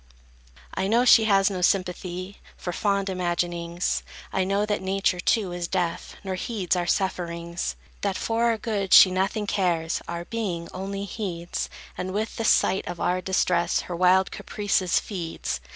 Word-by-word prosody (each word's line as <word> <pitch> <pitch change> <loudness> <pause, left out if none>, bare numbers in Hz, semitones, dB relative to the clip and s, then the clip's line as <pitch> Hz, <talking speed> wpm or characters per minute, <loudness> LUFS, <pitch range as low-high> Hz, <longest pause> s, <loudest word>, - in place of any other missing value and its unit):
I 190 - -1
know 235 +4 +3
she 225 -3 +7
has 195 -2 +4
no 185 -2 -3
sympathy 185 0 -1 0.2
For 175 - -4
fond 200 0 0
imaginings; 175 -1 -1 0.3
I 190 - +2
know 200 +2 +1
that 210 -1 -1
Nature, 190 -1 0
too, 195 0 +1
is 175 -1 -3
deaf, 175 -2 -2
Nor 190 -1 -3
heeds 185 -1 -1
our 175 -1 -1
sufferings; 170 -2 -2 0.3
That 195 -2 -1
for 230 +1 0
our 230 -1 +2
good 205 -4 +1
she 185 - +9
nothing 195 +3 0
cares, 175 -5 0
Our 170 0 -4
being, 185 -7 -3
only 195 +2 -4
heeds; 180 -5 -4 0.3
And 185 +1 -3
with 215 +1 -2
the 225 - -1
sight 195 - +3
of 175 - -5
our 180 +1 +1
distress 180 -2 +1
Her 175 - -6
wild 185 +2 +4
caprices 195 -3 0
feeds. 175 -6 -4
185 Hz, 160 wpm, -25 LUFS, 175-200 Hz, 0.3 s, she